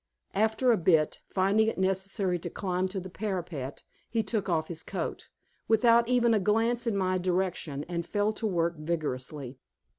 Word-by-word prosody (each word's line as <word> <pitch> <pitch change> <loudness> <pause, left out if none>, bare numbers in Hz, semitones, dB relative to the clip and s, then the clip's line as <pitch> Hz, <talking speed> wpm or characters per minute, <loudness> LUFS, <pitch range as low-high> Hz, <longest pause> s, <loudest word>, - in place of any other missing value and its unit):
After 220 +4 +3
a 225 - +4
bit, 160 -3 +3
finding 200 +3 +2
it 225 - -1
necessary 190 -1 0
to - - -5
climb 185 -1 -1
to 190 +1 -4
the 185 - -7
parapet, 175 -10 -4 0.3
he 225 -1 0
took 210 -2 -2
off 160 -2 +1
his 165 -2 -4
coat, - - -5 0.4
without 230 +1 +5
even 240 -2 +4
a 215 - +4
glance 225 +4 +1
in 215 -3 +1
my 185 -1 +1
direction, 180 -5 -1
and 170 +1 -3
fell 205 +4 0
to 220 +1 -2
work 170 -3 0
vigorously. 145 -4 -4
190 Hz, 170 wpm, -29 LUFS, 170-220 Hz, 0.4 s, without